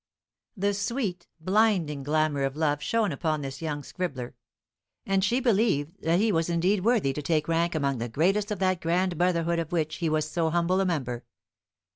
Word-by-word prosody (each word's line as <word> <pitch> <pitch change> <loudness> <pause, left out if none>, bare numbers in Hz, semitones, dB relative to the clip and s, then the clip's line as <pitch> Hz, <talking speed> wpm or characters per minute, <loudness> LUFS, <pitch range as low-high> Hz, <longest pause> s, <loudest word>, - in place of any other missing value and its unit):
The 200 +1 +1
sweet, 200 -3 -3
blinding 185 -5 +2
glamour 150 0 +1
of 135 0 -1
love 150 -2 0
shone 225 -4 +1
upon 155 +1 -1
this 135 +1 -6
young 150 -3 -3
scribbler, 135 -10 -5 0.7
and 195 -1 +1
she 235 +6 +2
believed 200 - +1
that 165 +2 +2
he 220 +1 +3
was 165 -2 0
indeed 180 +3 +1
worthy 215 - +2
to 150 - -4
take 155 +1 0
rank 165 +1 +1
among 140 -4 0
the 120 +1 -3
greatest 195 - +1
of 210 - -2
that 185 -1 0
grand 175 +2 +1
brotherhood 170 -1 +1
of 165 0 -4
which 155 -3 -1
he 165 -2 -1
was 155 0 0
so 165 0 0
humble 175 +3 +1
a 190 - +1
member. 130 -8 -2
170 Hz, 185 wpm, -27 LUFS, 150-190 Hz, 0.7 s, he